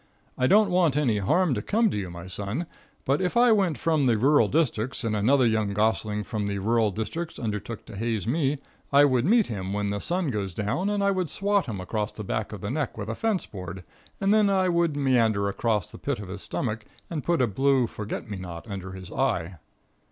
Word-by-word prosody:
I 130 - +2
don't 205 +2 +5
want 170 -6 +3
any 120 -8 +2
harm 170 - +2
to 105 - -2
come 220 - +2
to - - -3
you, 95 -3 -3
my 85 0 -8
son, 100 - -4 0.4
but 140 +5 +1
if 185 +5 0
I 240 0 +6
went 190 -8 +2
from 155 -5 +1
the 115 -3 +3
rural 140 +6 +4
districts 130 -6 0
and 110 -2 0
another 125 +6 +3
young 110 -3 +1
gosling 105 0 0
from 105 0 -3
the 100 0 -2
rural 110 +2 +2
districts 110 - -4
undertook 105 -1 -4
to - - -10
haze 110 -2 -2
me, 145 +3 +1 0.3
I 140 +1 +7
would 130 -3 +2
meet 225 +1 +5
him 95 -3 -4
when 100 0 -1
the 100 - -2
sun 175 - -1
goes 100 -5 -3
down, 115 - -1
and 205 -1 0
I 200 - +3
would 185 -4 -1
swat 200 +2 0
him 105 -5 -4
across 105 +3 -2
the 105 - -7
back 110 +1 -3
of 105 - -7
the 100 - -3
neck 150 -3 -2
with 105 0 -5
a 115 - -2
fence 215 - 0
board, 90 -2 -8 0.4
and 195 +1 +3
then 215 -2 +4
I 190 -2 +2
would 170 -4 +1
meander 115 -7 +2
across 105 -1 -1
the - - -11
pit - - -2
of 100 -3 -8
his 100 +1 -6
stomach 115 -3 -3 0.3
and 155 -5 -3
put 170 -1 +1
a 125 - +4
blue 135 +4 +2
forget 105 -2 -6
me 105 -2 -5
not 90 0 -8
under 95 -2 -6
his 95 -1 -9
eye. 85 +2 -1
115 Hz, 225 wpm, -26 LUFS, 100-165 Hz, 0.4 s, I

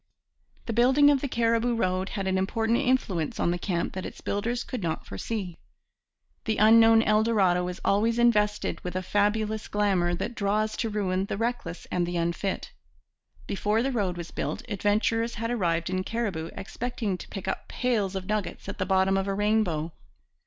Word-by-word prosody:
The 230 - -3
building 265 +5 +5
of 275 -2 +2
the 280 - -1
Cariboo 230 -1 +1
Road 185 -3 0
had 195 - -2
an 190 0 +1
important 225 +4 +1
influence 245 - 0
on 170 - +2
the 175 - -2
camp 175 -2 -2
that 185 - -4
its - - -8
builders 235 +4 -2
could 250 -4 -5
not 165 -3 -3
foresee. 180 - -5 0.9
The 220 -1 0
unknown 225 +1 +7
El 215 -1 +3
Dorado 190 -6 +2
is 180 +1 -5
always 225 +4 +2
invested 210 -3 +2
with 180 0 -5
a 185 - -1
fabulous 210 +2 0
glamour 190 -4 +1
that 230 - -4
draws 215 +1 0
to 230 - -1
ruin 195 -3 -1
the 195 - -4
reckless 230 -7 -3
and 175 -1 0
the 175 0 -2
unfit. 170 +3 -2 0.7
Before 210 +3 0
the 270 - 0
road 195 -7 -1
was 170 -1 -7
built 220 - -3
adventurers 220 +3 0
had 230 +2 -3
arrived 170 -7 0
in 185 0 -1
Cariboo 195 -8 -3
expecting 220 -1 -3
to - - -10
pick 195 -1 -7
up 190 - -3
pails 215 -6 -1
of 190 -1 -4
nuggets 210 -1 -3
at 200 - -6
the 185 - -1
bottom 190 0 +3
of 195 0 -1
a 195 - -1
rainbow. 195 -7 +1
205 Hz, 180 wpm, -27 LUFS, 185-230 Hz, 0.9 s, unknown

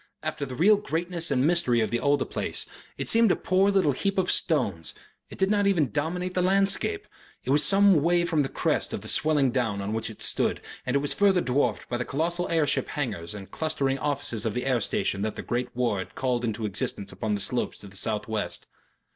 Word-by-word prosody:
After 140 - -3
the 130 - -6
real 200 +9 +5
greatness 170 -3 -3
and 135 -1 +2
mystery 160 -8 +3
of 110 -2 0
the 120 - 0
older 145 -1 +2
place, - - -2 0.3
it - - -4
seemed 225 -3 +4
a - - +3
poor 190 +2 +2
little 195 -7 +3
heap 195 +9 -2
of 185 -1 +2
stones; 100 - +1 0.3
it - - -10
did 190 +1 +1
not 205 -1 +3
even 165 -10 +2
dominate 180 +5 -2
the 180 - +1
landscape; 195 - +1 0.4
it 130 - -2
was 145 +1 +4
some 195 -5 +5
way 175 +2 +3
from 165 -3 +1
the 135 - -1
crest - - -1
of - - -3
the - - -9
swelling 150 -4 +2
down 115 -5 -1
on 100 +2 -3
which 115 +1 -3
it 110 - -9
stood - - 0 0.3
and 125 - 0
it - - +4
was - - +1
further 195 -2 +3
dwarfed 125 -6 0
by 120 - -2
the 125 - -2
colossal 170 +7 -1
air 165 -2 +2
ship - - 0
hangars 105 - -4
and 100 -2 -9
clustering 140 -4 -1
offices 140 -6 -2
of 110 -3 -2
the 125 - -2
air 125 -3 +1
station 100 0 -1
that 110 +1 -2
the - - -6
great 125 +1 -2
war 120 -5 0
had 95 - -7
called 125 -2 -1
into 110 -1 -2
existence 100 0 -3
upon 105 +3 -2
the - - -3
slopes 120 +5 -1
to - - -10
the 100 0 -13
south 105 +2 -2
west. 110 -1 -3
140 Hz, 230 wpm, -26 LUFS, 115-175 Hz, 0.4 s, real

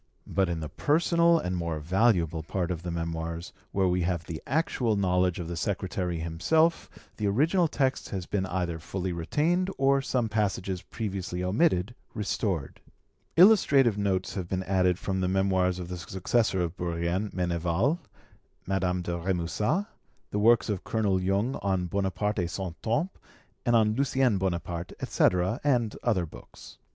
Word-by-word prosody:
But 95 -2 0
in 85 -2 -2
the 75 - -5
personal 170 - +3
and 90 - -2
more 85 -3 -2
valuable 85 -1 +2
part 90 +3 -2
of 85 -2 -3
the 90 - -5
Memoirs, 85 0 -4 0.2
where 95 -1 +2
we 90 0 +1
have 85 -1 -1
the 80 -2 -6
actual 130 -6 +1
knowledge 90 -2 +2
of 85 - -5
the 85 - -4
secretary 90 -1 -2
himself, 95 - +1 0.3
the 105 - -1
original 160 - +3
text 135 -3 -1
has 95 -3 -4
been 95 -1 -1
either 90 -3 -2
fully 90 +2 -3
retained, 160 - 0
or 135 0 +3
some 130 -2 0
few 105 - -13
passages 95 -3 -1
previously 95 -4 -4
omitted 100 - +2 0.2
restored. 100 - -2 0.6
Illustrative 145 - +6
notes 95 -2 -1
have 95 -4 -4
been 95 +1 -2
added 90 -2 +2
from 95 -1 -2
the 90 - +1
Memoirs 95 -1 +1
of 90 -2 -6
the 90 0 -6
successor 95 +2 0
of 85 0 -3
Bourrienne, 85 +4 -1
Meneval, 90 - 0 0.7
Madame 90 -2 0
de 85 0 -2
Remusat, 95 - 0 0.5
the 105 - -1
works 115 +2 +5
of 105 -4 -2
Colonel 100 -4 0
Jung 100 +7 0
on 95 -2 0
'Bonaparte 100 +3 -1
et 90 - 0
Son 95 -1 -4
Temps', 145 +12 0 0.6
and 120 - +4
on 110 -1 +4
'Lucien 130 -4 +2
Bonaparte', 85 -2 -3
etc., 90 +5 +1
and 120 -7 +1
other 100 -8 +1
books. 75 - -13
95 Hz, 160 wpm, -28 LUFS, 90-115 Hz, 0.7 s, Illustrative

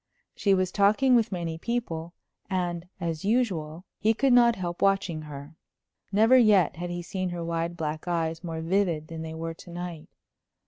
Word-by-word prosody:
She 200 -2 +2
was 185 -1 0
talking 215 +7 +4
with 230 -2 +3
many 170 -3 -3
people, 170 -7 -3 0.3
and, 175 -2 -2
as 165 -3 -3
usual, 185 -7 0
he 220 +2 +2
could 270 +2 +3
not 235 -1 +6
help 175 -3 -5
watching 195 -5 +1
her. 150 0 -9 0.6
Never 220 +5 +5
yet 205 -10 +4
had 175 +1 -4
he 175 0 -4
seen 185 +1 -3
her 175 -1 -4
wide, 170 +1 -2
black 155 0 -4
eyes 165 -1 -1
more 165 -2 -4
vivid 170 -3 0
than 165 -1 -6
they 160 0 -6
were 165 0 -4
to 165 - -14
night. 175 -2 -7
175 Hz, 175 wpm, -27 LUFS, 165-200 Hz, 0.6 s, not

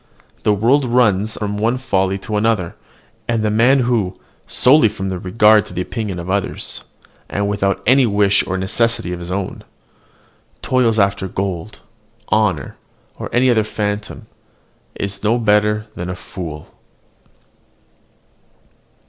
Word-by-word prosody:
The 105 - +2
world 120 +8 +3
runs 110 -4 +2
on - - -8
from 105 0 -2
one 115 +4 +1
folly 95 -7 0
to 110 - -3
another; 105 -5 0 0.5
and 115 -2 0
the 105 - +1
man 125 +5 +4
who, 115 -7 -1 0.3
solely 130 -2 +5
from 95 -2 -5
regard 105 +4 +3
to - - -11
the 90 - -1
opinion 105 -1 -4
of 85 0 -6
others, 100 +1 -2 0.5
and 100 0 -1
without 100 -1 -1
any 130 +2 +5
wish 100 -1 +3
or 95 - -2
necessity 95 -1 +1
of 90 - -6
his 85 0 -8
own, 95 0 -4 1.0
toils 120 -4 +2
after 100 -2 +1
gold, 95 +1 -4 0.5
honour, 95 -10 0 0.4
or - - -5
any 125 +1 +3
other 110 -2 +3
phantom, 105 -1 -4 0.7
is 100 0 -5
no 110 +3 +2
better 105 -1 +2
than 90 +1 -6
a 90 - -4
fool. 80 -4 -8
105 Hz, 140 wpm, -18 LUFS, 95-115 Hz, 1.0 s, solely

